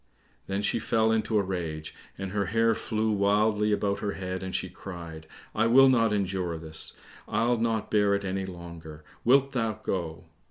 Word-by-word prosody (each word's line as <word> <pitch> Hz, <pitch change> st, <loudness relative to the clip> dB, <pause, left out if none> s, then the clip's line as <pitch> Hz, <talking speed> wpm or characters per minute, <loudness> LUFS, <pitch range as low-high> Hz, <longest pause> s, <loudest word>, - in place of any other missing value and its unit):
Then 100 Hz, +1 st, -2 dB
she 115 Hz, -, +1 dB
fell 110 Hz, 0 st, +2 dB
into 110 Hz, 0 st, +1 dB
a 100 Hz, -, +3 dB
rage, 80 Hz, -5 st, -4 dB, 0.2 s
and 95 Hz, -1 st, -5 dB
her 100 Hz, -2 st, -1 dB
hair 115 Hz, +3 st, +3 dB
flew 110 Hz, 0 st, -1 dB
wildly 105 Hz, +1 st, +2 dB
about 100 Hz, -1 st, 0 dB
her 100 Hz, -1 st, -2 dB
head, 95 Hz, -1 st, -4 dB
and 95 Hz, 0 st, -4 dB
she -, -, -1 dB
cried, 85 Hz, -4 st, -9 dB, 0.3 s
"I 110 Hz, +1 st, +2 dB
will 135 Hz, +3 st, +7 dB
not 115 Hz, -4 st, +3 dB
endure 95 Hz, -4 st, -1 dB
this, 80 Hz, 0 st, -1 dB, 0.3 s
I'll 120 Hz, +2 st, +1 dB
not 115 Hz, -1 st, -1 dB
bear 105 Hz, -1 st, +3 dB
it 100 Hz, 0 st, -3 dB
any 95 Hz, 0 st, -2 dB
longer; 85 Hz, -4 st, -9 dB, 0.2 s
wilt 135 Hz, +3 st, +4 dB
thou 115 Hz, -4 st, 0 dB
go?" 85 Hz, -5 st, -4 dB
100 Hz, 175 wpm, -28 LUFS, 90-110 Hz, 0.3 s, will